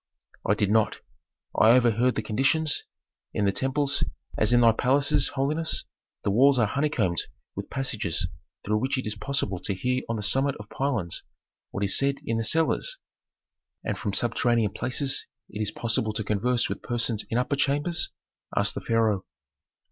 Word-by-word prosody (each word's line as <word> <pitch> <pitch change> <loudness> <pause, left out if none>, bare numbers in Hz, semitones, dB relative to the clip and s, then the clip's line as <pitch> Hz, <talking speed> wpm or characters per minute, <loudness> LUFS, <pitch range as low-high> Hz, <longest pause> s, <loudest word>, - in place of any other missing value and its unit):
"I 105 - +4
did 105 -1 +1
not. 110 -1 +3 0.6
I 110 +2 +6
overheard 120 0 +3
the 110 - -2
conditions. 135 +8 +1 0.5
In 105 - +1
the 100 - +3
temples, 140 +5 0 0.3
as 110 - +2
in 120 0 +5
thy 115 -1 +7
palaces, 140 +5 +2
holiness, 150 +4 -1 0.4
the - - +1
walls 135 +6 +5
are 120 - +4
honeycombed 110 - 0 0.3
with - - -6
passages 105 -10 -1 0.4
through 105 +1 +1
which 135 +4 0
it 130 - -3
is 105 - -2
possible 105 -4 -2
to 100 - -3
hear 125 +6 0
on 115 - 0
the 105 - -4
summit 135 +6 +2
of 105 0 -11
pylons 120 -12 -2 0.5
what 100 - -3
is 100 - +2
said 140 0 +3
in 115 - 0
the - - 0
cellars." 165 - +2 0.9
"And - - -2
from 105 - -3
subterranean 115 -1 +2
places 135 +2 0 0.2
it 105 - -5
is 105 - 0
possible 110 -1 -1
to 110 0 -2
converse 115 +4 +1
with - - -5
persons 115 -3 -1
in 115 - 0
upper 125 +3 +1
chambers?" 145 +5 +1 0.5
asked - - +3
the - - -5
pharaoh. 110 -4 +1
120 Hz, 170 wpm, -26 LUFS, 105-135 Hz, 0.9 s, thy